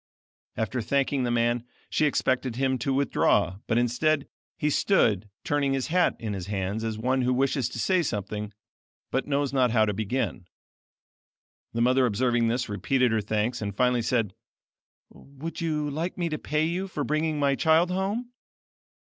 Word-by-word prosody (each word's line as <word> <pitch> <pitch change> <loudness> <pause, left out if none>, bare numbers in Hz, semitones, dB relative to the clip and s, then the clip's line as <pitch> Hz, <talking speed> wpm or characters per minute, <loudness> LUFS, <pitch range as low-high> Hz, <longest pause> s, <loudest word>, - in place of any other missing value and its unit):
After 115 +3 -1
thanking 135 +3 +1
the - - 0
man, 120 0 +1 0.2
she 155 - +2
expected 130 -3 0
him 130 0 0
to 135 - -1
withdraw, 135 -8 +2
but 115 - +1
instead, 135 +5 +1 0.3
he 150 - 0
stood 110 - +2
turning 140 -2 +1
his 135 +3 -1
hat 180 +1 +3
in 110 -2 -4
his 95 -2 -5
hands 100 +2 -2
as 110 -1 -2
one 130 +4 +1
who 125 0 +1
wishes 130 -1 +1
to - - -7
say 185 +10 +2
something, 105 - -3 0.6
but 135 - -1
knows 140 -1 0
not 130 -2 +3
how 110 -1 +3
to 105 - -1
begin. 110 -3 -2 1.3
The 115 - -1
mother 125 +1 +4
observing 120 +1 +1
this, 120 +2 0
repeated 120 +5 +1
her 110 -1 +1
thanks 110 +4 -1
and 100 -1 -4
finally 125 -1 +3
said: 115 -4 0 0.8
"Would 140 +5 -8
you 155 -2 -1
like 160 +5 -3
me 170 -2 -1
to 155 -2 -3
pay 155 +2 0
you 180 +4 -2
for 150 -6 -3
bringing 155 +1 0
my 140 -1 +3
child 160 +5 +3
home?" 205 +6 -2
130 Hz, 170 wpm, -27 LUFS, 115-150 Hz, 1.3 s, mother